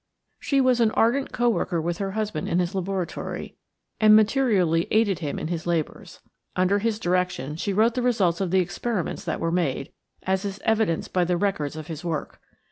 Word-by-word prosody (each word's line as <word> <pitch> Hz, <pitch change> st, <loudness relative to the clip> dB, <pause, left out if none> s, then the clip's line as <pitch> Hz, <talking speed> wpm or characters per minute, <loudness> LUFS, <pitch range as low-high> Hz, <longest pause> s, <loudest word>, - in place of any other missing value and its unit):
She 275 Hz, -, +1 dB
was 255 Hz, -2 st, +3 dB
an 225 Hz, -, +4 dB
ardent 255 Hz, +5 st, +2 dB
co 240 Hz, 0 st, +1 dB
worker 180 Hz, -5 st, 0 dB
with 170 Hz, +3 st, -2 dB
her 195 Hz, -1 st, -2 dB
husband 215 Hz, -7 st, -2 dB
in 170 Hz, -, +1 dB
his 180 Hz, +1 st, 0 dB
laboratory 190 Hz, -1 st, -4 dB, 0.4 s
and 215 Hz, -1 st, +7 dB
materially 210 Hz, -8 st, +3 dB
aided 210 Hz, -6 st, +2 dB
him 145 Hz, -3 st, -3 dB
in 155 Hz, -, -4 dB
his 170 Hz, -1 st, -4 dB
labors. 165 Hz, -3 st, -3 dB, 0.3 s
Under 185 Hz, +2 st, +2 dB
his 220 Hz, 0 st, 0 dB
direction 180 Hz, -7 st, -1 dB
she 185 Hz, +5 st, -2 dB
wrote 220 Hz, +4 st, +3 dB
the 250 Hz, -, -1 dB
results 200 Hz, -8 st, +1 dB
of 190 Hz, -, 0 dB
the 190 Hz, +1 st, +3 dB
experiments 195 Hz, +1 st, -3 dB
that 170 Hz, -, -2 dB
were 165 Hz, -, -1 dB
made, 160 Hz, -6 st, -1 dB, 0.3 s
as 190 Hz, 0 st, 0 dB
is 200 Hz, -1 st, -4 dB
evidenced 220 Hz, -7 st, +1 dB
by 180 Hz, -, +3 dB
the 175 Hz, 0 st, 0 dB
records 165 Hz, -7 st, -1 dB
of 155 Hz, -1 st, -7 dB
his 160 Hz, -2 st, -7 dB
work. 165 Hz, -3 st, -4 dB
190 Hz, 195 wpm, -25 LUFS, 170-215 Hz, 0.4 s, and